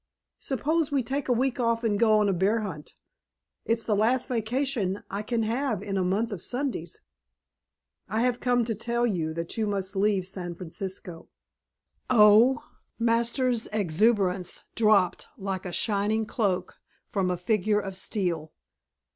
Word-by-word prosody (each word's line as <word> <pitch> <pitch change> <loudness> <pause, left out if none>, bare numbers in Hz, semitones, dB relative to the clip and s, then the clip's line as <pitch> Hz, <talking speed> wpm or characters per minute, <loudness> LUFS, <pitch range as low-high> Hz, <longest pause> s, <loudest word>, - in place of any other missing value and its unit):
Suppose 300 +3 0
we 275 -3 +1
take 270 +3 -3
a - - +4
week 255 +2 +1
off 230 -1 +1
and 210 -3 +1
go 220 -2 +5
on 210 -1 +3
a 195 - +2
bear 200 +5 +1
hunt? 165 -8 -7 0.7
It's 230 0 +1
the 215 -1 +1
last 235 +5 +2
vacation 235 -4 -1
I 200 - -2
can 225 +1 -1
have 235 +1 -1
in 195 - -3
a 190 - +1
month 205 +6 0
of 195 -5 -5
Sundays." 245 - -4 1.1
"I 220 - 0
have 245 0 +1
come 245 -2 +2
to 225 - -1
tell 235 +3 -1
you 170 -8 -1
that 170 +4 -4
you 220 -1 0
must 195 -1 -2
leave 195 -1 +2
San 180 -3 -5
Francisco." 180 -1 -6 0.8
"Oh!" 235 +4 +6 0.3
Masters' 235 +1 +1
exuberance 195 -1 +1
dropped 210 -5 +3
like 190 -1 -4
a - - -5
shining 215 +2 0
cloak 205 -4 -1 0.3
from 195 -5 0
a 180 - -1
figure 210 +3 +1
of 195 -2 -5
steel. 175 -6 -2
215 Hz, 155 wpm, -27 LUFS, 190-235 Hz, 1.1 s, Oh